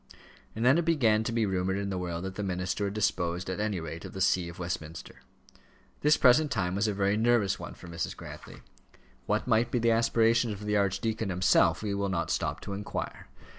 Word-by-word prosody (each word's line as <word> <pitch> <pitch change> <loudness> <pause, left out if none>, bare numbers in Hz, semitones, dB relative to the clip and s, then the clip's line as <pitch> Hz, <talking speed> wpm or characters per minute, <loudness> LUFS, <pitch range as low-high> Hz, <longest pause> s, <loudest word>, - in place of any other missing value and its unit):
And 115 +2 -1
then 135 +6 +5
it 170 - -1
began 115 -10 +3
to - - -1
be 115 -1 +1
rumoured 95 0 -1
in 100 0 -3
the 95 - -2
world 85 -1 -4
that 95 0 -4
the 105 - -5
minister 95 +1 -2
had 100 +1 -3
disposed 90 -3 -1
at 95 - -4
any 105 -3 -1
rate 80 0 -7
of - - -9
the 95 - -6
see 90 -2 +2
of 85 - -11
Westminster. 85 -2 -6 0.8
This 150 +1 +4
present 150 +5 +5
time 95 -7 -1
was 100 +3 +1
a 105 - 0
very 100 +1 +1
nervous 110 -3 +2
one - - -8
for - - -12
Mrs. 85 -1 -4
Grantly. - - -10 0.7
What - - 0
might 115 -1 +2
be 125 - 0
the 115 0 +2
aspirations 115 0 +3
of 105 +1 -8
the 105 0 0
archdeacon 100 +2 0
himself, 90 +3 +3
we 105 -2 -1
will 100 0 -1
not 85 -3 -1
stop - - -2
to 100 - -6
inquire. 100 +1 -5
100 Hz, 215 wpm, -29 LUFS, 90-115 Hz, 0.8 s, then